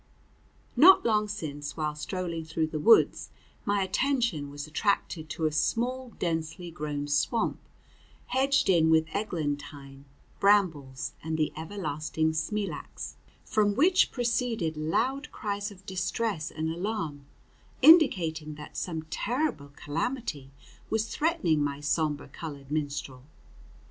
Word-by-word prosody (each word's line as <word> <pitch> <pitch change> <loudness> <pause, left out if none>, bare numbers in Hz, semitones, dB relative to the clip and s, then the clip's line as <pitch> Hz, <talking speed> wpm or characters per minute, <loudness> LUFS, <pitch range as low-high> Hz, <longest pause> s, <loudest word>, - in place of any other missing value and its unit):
Not 355 +10 +8
long 215 -2 +2
since, 145 -8 -5
while 155 -1 -1
strolling 170 +2 -4
through 160 0 -1
the 155 0 -4
woods, 225 +9 +5 0.4
my 200 -1 +2
attention 220 - 0
was 145 0 -6
attracted 160 -1 -1
to 160 +1 -2
a 155 - +2
small 245 +11 0
densely 165 +1 -3
grown 150 -3 -4
swamp, 185 - +1 0.7
hedged 275 +2 +2
in 165 -4 +4
with 160 0 +3
eglantine, 145 -7 -4 0.3
brambles, 165 -11 +2
and 160 0 -2
the 155 -1 0
everlasting 160 -2 -2
smilax, 200 +6 -4 0.3
from 205 -2 +2
which 360 - +4
proceeded 235 - -1
loud 245 - -1
cries 205 0 -3
of 195 -2 -15
distress 190 -1 -2
and 160 0 -3
alarm, 165 -6 -4 0.6
indicating 165 - +5
that 150 0 -11
some 160 -3 -3
terrible 245 - -1
calamity 165 - -3 0.4
was 220 0 +1
threatening 185 - +2
my 140 -1 -2
sombre 150 0 -1
colored 145 -4 -8
minstrel. 145 -4 -3
165 Hz, 120 wpm, -28 LUFS, 150-215 Hz, 0.7 s, Not